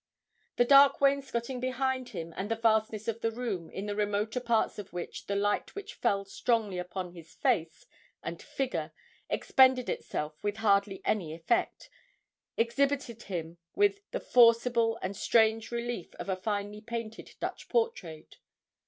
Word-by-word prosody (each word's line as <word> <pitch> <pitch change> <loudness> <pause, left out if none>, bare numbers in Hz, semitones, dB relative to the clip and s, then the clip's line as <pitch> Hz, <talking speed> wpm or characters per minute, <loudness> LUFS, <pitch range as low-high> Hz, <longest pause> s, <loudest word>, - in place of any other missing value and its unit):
The 245 - +4
dark 275 +2 +7
wainscoting 270 -3 +1
behind 255 0 -1
him, 165 0 -6
and 200 +2 -4
the 225 - +1
vastness 220 -1 +1
of 230 0 -2
the 225 - +1
room, 225 -8 -4
in 195 - -5
the 205 -1 -3
remoter 210 +3 0
parts 235 -3 +1
of 205 - -8
which 175 -1 -6
the 200 - -1
light 205 +1 0
which 405 -1 -7
fell 200 0 0
strongly 210 -2 0
upon 180 0 -5
his 165 -2 -13
face 160 -1 0 0.4
and - - -5
figure 270 -2 -3 0.4
expended 260 -2 +4
itself 150 0 -4
with 205 0 -1
hardly 200 -2 +2
any 165 -7 0
effect, 170 +8 -1 0.7
exhibited 240 0 0
him 170 -4 -5 0.2
with 405 0 +3
the - - -3
forcible 230 - +4
and 190 +2 -3
strange 220 +1 +3
relief 235 -6 -4
of - - -7
a 190 - +1
finely 205 +2 -3
painted 230 0 -6
Dutch - - -5
portrait. 320 - -2
220 Hz, 150 wpm, -30 LUFS, 195-245 Hz, 0.7 s, dark